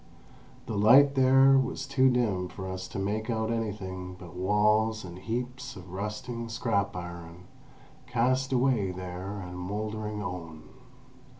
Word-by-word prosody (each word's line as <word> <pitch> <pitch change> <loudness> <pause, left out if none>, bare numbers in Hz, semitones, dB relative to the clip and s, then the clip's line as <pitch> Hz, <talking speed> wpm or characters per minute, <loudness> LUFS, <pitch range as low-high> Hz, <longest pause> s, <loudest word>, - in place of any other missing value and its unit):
The 110 - -4
light 135 +7 +7
there 135 0 +6
was 135 +1 -2
too 130 -1 +4
dim 110 -8 +1
for 95 +1 -7
us 95 0 -5
to - - -7
make 105 +3 -2
out 110 -1 0
anything 95 -5 -4
but 90 -2 -11
walls 105 +3 +2
and 90 0 -9
heaps 125 +5 -4
of 90 -1 -11
rusting 115 +4 -4
scrap 100 -3 0
iron 85 -1 -8 0.6
cast 130 +2 +1
away 125 -6 +2
there 90 +2 -6
and 90 0 -7
mouldering 105 +3 -4
own. 85 -4 -6
105 Hz, 135 wpm, -29 LUFS, 90-120 Hz, 0.6 s, light